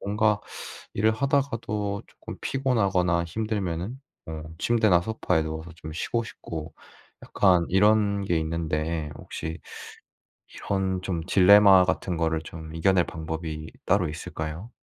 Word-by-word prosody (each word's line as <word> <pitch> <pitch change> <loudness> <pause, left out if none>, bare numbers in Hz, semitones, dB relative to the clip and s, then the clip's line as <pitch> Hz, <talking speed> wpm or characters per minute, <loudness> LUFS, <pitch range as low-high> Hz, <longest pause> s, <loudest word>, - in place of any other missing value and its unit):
뭔가 105 +1 +1 0.5
일을 110 +2 +3
하다가도 115 -6 -1
쪼끔 - - -10
피곤하거나 100 -10 +1
힘들면은 100 +1 -3 0.3
어 80 -1 -6 0.2
침대나 110 -6 +4
소파에 90 -5 0
누워서 80 +1 -6
좀 80 -1 -8
쉬고 115 +8 -1
싶고 80 -8 -7 0.5
약간 90 -4 +3
이런 100 +1 +3
게 85 -3 +1
있는데 80 -1 -2
혹시 80 +1 -6 1.0
이런 95 -2 -1
좀 90 -3 -3
딜레마 100 0 +7
같은 90 -1 -1
거를 80 -1 0
좀 80 0 -9
이겨낼 90 +2 +3
방법이 80 -1 -5 0.2
따로 95 -2 +3
있을까요? 80 +4 -6
90 Hz, 270 characters per minute, -26 LUFS, 80-105 Hz, 1.0 s, 딜레마